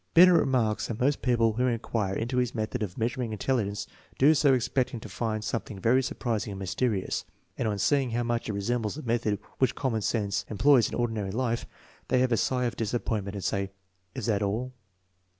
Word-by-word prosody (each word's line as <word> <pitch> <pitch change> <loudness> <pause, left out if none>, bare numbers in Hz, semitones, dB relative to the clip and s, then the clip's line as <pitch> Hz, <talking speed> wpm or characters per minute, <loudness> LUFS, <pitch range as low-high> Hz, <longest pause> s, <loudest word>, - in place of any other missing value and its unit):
Binet 180 +2 +9
remarks 130 -9 +2
that 115 -1 -5
most 140 +3 +1
people 115 -3 +2
who 125 +3 +1
inquire 110 -4 -1
into 120 +4 -2
his 125 -1 0
method 110 +2 -2
of 95 -4 -4
measuring 120 0 -1
intelligence 105 -2 -1 0.3
do 145 +4 +6
so 145 -2 +4
expecting 125 -1 0
to 110 - -9
find 110 +2 -3
something 110 -2 -3
very 120 +6 +3
surprising 115 -5 -2
and - - -7
mysterious; 100 +1 -1 0.3
and - - -1
on 105 -1 -1
seeing 135 +5 +2
how 120 +1 -1
much 120 -1 -1
it - - -1
resembles 110 +3 -1
the 155 - -7
methods 115 -3 0 0.2
which 130 -3 +2
common 120 -5 -1
sense 100 -1 0
employs 120 +3 +4
in - - -5
ordinary 115 -5 -1
life, 115 +2 -1 0.4
they 130 - +2
heave 130 -1 +2
a 115 - +3
sigh 125 +2 +1
of 120 - -2
disappoint 110 -2 -1
ment 100 +1 -6
and 100 - -5
say, 100 0 -1 0.2
" 90 0 -43
Is - - -4
that 105 -3 +1
all? 115 +6 -1
115 Hz, 205 wpm, -28 LUFS, 105-125 Hz, 0.4 s, Binet